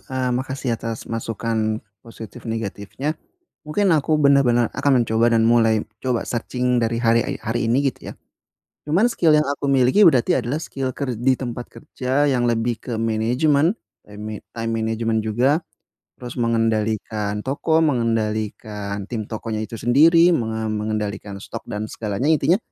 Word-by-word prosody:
eee, 130 -1 -1
makasih 130 0 -2
atas 115 -1 -5
masukan, 115 -1 -2 0.2
positif 115 0 -10
negatifnya, 115 +6 -3 0.5
mungkin 190 +7 0
aku 155 +1 +1
bener-bener 135 -5 +4
akan 135 -4 +3
mencoba 115 +1 +2
dan 115 -1 +3
mulai 115 -2 +3 0.2
coba 125 -3 0
searching 125 +1 -1
dari 115 +1 0
harek 115 +4 +1
hari 115 +1 -2
ini 120 +4 +3
gitu - - -10
ya, - - -10 0.7
cuman 180 +11 +3
skill 170 -9 +2
yang 150 - +3
aku 140 0 -3
miliki 135 +9 +4
berarti 130 -7 +5
adalah 125 +5 -1
skill 135 -4 -4
ker 135 -3 -2
di 125 +4 +2
tempat 120 -1 -5
kerja 140 -1 -1
yang 125 -3 +1
lebih 115 0 0
ke 120 - -7
manajemen 125 - +2 0.4
eme 105 +1 -7 0.2
time 115 0 -2
management 115 0 0
juga, 130 +9 +2 0.6
terus 125 -1 -8
mengendalikan 110 -2 0
toko 150 +4 +1
mengendalikan 110 -5 -1
tim 110 -3 -3
tokonya 110 0 -4
itu 115 - -10
sendiri 165 +9 +5
menga 110 -5 -2
mengendalikan 105 -1 -3
stok - - -7
dan 105 +1 -3
segalanya 105 +3 -3
intinya, 160 +4 +3
120 Hz, 145 wpm, -21 LUFS, 110-135 Hz, 0.7 s, berarti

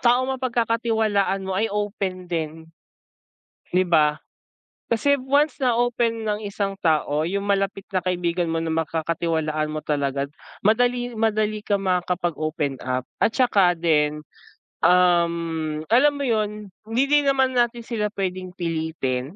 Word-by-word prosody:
taong 255 +2 +3
mapagkakatiwalaan 225 -5 0
mo 190 - -3
ay 205 +4 +1
open 200 -3 -3
din. 160 -2 -4 1.0
'Di 185 +1 +2
ba? 155 -4 +3 0.7
Kasi 260 +5 +3
once 280 +3 +1
na 250 -2 +3
open 235 -2 0
ng 210 0 -1
isang 200 -1 -3
tao 155 -2 +2
'yung 200 +4 -2
malapit 195 -1 0
na 185 - +1
kaibigan 175 -1 -1
mo 165 - 0
na 165 0 -2
makakatiwalaan 160 -1 -1
mo 155 - -3
talaga 140 -2 0 0.4
madali 245 +2 +2
madali 215 -1 0
kang 200 -2 -1
makakapag 180 -2 0
open 155 -3 -2
up. 130 0 -2 0.2
At - - +4
'saka 195 -9 +3
din, 150 -2 +1 0.6
um, 170 -3 +2
alam 285 +5 +5
mo 285 - -3
'yun 210 -4 -1 0.2
hindi 230 +4 +2
din 290 -1 +4
naman 265 -1 +3
natin 240 -1 +1
sila 225 -2 -2
puwedeng 185 -2 -4
pilitin 160 -5 -3
190 Hz, 135 wpm, -23 LUFS, 165-225 Hz, 1.0 s, alam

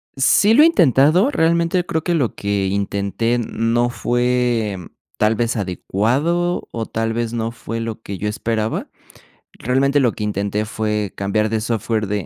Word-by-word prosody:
Sí, 170 +10 +4
lo 295 - +7
he - - +8
intentado, 170 - +4
realmente 170 - +1
creo 160 -2 -2
que 175 0 0
lo 135 -8 0
que 100 -1 -1
intenté 100 +4 -1
no 120 +1 0
fue 120 -4 0 0.4
tal 110 +1 +2
vez, 120 +1 -1
adecuado, 130 - -1
o 115 -1 -3
tal 115 +1 -2
vez, 115 0 -2
no 115 -1 -2
fue 115 0 -6
lo 115 -1 -5
que 100 -3 -6
yo 105 - -2
esperaba, 110 0 -2 0.7
realmente 135 +4 +1
lo 120 -4 +3
que 105 - -6
intenté 105 +1 -2
fue 105 -2 -2
cambiar 105 +2 0
de 110 -1 -1
software 110 -1 -1
de 100 -2 -2
115 Hz, 160 wpm, -19 LUFS, 105-135 Hz, 0.7 s, he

